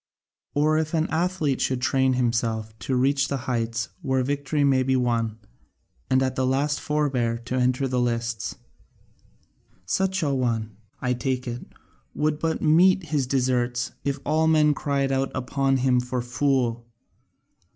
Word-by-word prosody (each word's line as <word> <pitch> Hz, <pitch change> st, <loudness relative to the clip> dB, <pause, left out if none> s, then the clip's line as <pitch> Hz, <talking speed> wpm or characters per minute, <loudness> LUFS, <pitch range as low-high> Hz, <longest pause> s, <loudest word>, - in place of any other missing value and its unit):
Or 155 Hz, +2 st, +3 dB
as 160 Hz, -1 st, +1 dB
if 155 Hz, -, -14 dB
an 160 Hz, 0 st, +2 dB
athlete 160 Hz, -5 st, 0 dB
should 130 Hz, -1 st, 0 dB
train 130 Hz, +1 st, +2 dB
himself 115 Hz, -3 st, -1 dB, 0.2 s
and 130 Hz, -1 st, +2 dB
reach 140 Hz, +2 st, +2 dB
the 140 Hz, -, -2 dB
heights 115 Hz, -3 st, -1 dB
where 130 Hz, -4 st, 0 dB
victory 145 Hz, +2 st, -1 dB
may 135 Hz, -2 st, +4 dB
be 130 Hz, +1 st, +1 dB
won 115 Hz, -3 st, 0 dB, 0.7 s
and 130 Hz, 0 st, +3 dB
at 130 Hz, 0 st, -1 dB
the 130 Hz, -, 0 dB
last 140 Hz, +3 st, +1 dB
forbear 135 Hz, -6 st, 0 dB
to 125 Hz, -, -4 dB
enter 130 Hz, +1 st, +1 dB
the 125 Hz, -1 st, 0 dB
lists 115 Hz, -2 st, -2 dB, 1.3 s
such 190 Hz, -, 0 dB
an 140 Hz, -2 st, +1 dB
one, 115 Hz, -4 st, -1 dB, 0.3 s
I 125 Hz, -1 st, +1 dB
take 125 Hz, +1 st, -2 dB
it, 120 Hz, 0 st, -5 dB, 0.5 s
would 150 Hz, 0 st, 0 dB
but 160 Hz, 0 st, -1 dB
meet 180 Hz, +4 st, +5 dB
his 140 Hz, -4 st, 0 dB
deserts 125 Hz, -2 st, 0 dB
if 140 Hz, 0 st, -1 dB
all 160 Hz, +2 st, +2 dB
men 155 Hz, -2 st, +4 dB
cried 140 Hz, -1 st, -1 dB
out 135 Hz, 0 st, 0 dB
upon 135 Hz, +1 st, 0 dB
him 130 Hz, -1 st, +2 dB
for 125 Hz, +1 st, -3 dB
a 120 Hz, -, -1 dB
fool. 120 Hz, -2 st, 0 dB
130 Hz, 160 wpm, -25 LUFS, 125-145 Hz, 1.3 s, meet